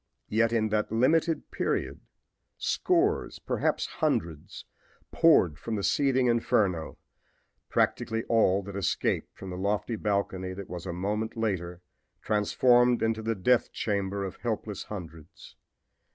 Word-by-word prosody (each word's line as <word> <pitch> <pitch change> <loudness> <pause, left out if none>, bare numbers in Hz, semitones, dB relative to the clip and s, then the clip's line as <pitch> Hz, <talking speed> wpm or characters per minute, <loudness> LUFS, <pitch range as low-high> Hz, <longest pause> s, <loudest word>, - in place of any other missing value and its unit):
Yet 115 +1 +2
in 110 -2 +1
that 105 0 0
limited 160 +8 +1
period - - -2 0.6
scores, 370 +4 +1
perhaps - - -1
hundreds, 85 - -3 0.5
poured 90 - +4
from 115 +3 -3
the 100 - -3
seething 130 0 +2
inferno 105 -8 +1 0.7
practically 115 0 0
all 100 -4 +2
that 100 0 -8
escaped 100 - -1
from 95 -1 -8
the 90 - -5
lofty 105 +4 -1
balcony 100 -3 -2
that 100 0 -9
was 90 +1 -6
a - - -2
moment 105 +6 -3
later 90 -5 -2 0.4
transformed 120 +3 +3
into 110 0 0
the 115 +1 -1
death 120 +6 +2
chamber 100 -1 -2
of 95 - -7
helpless 110 -3 -4
hundreds. 80 -6 -10
105 Hz, 125 wpm, -28 LUFS, 95-115 Hz, 0.7 s, poured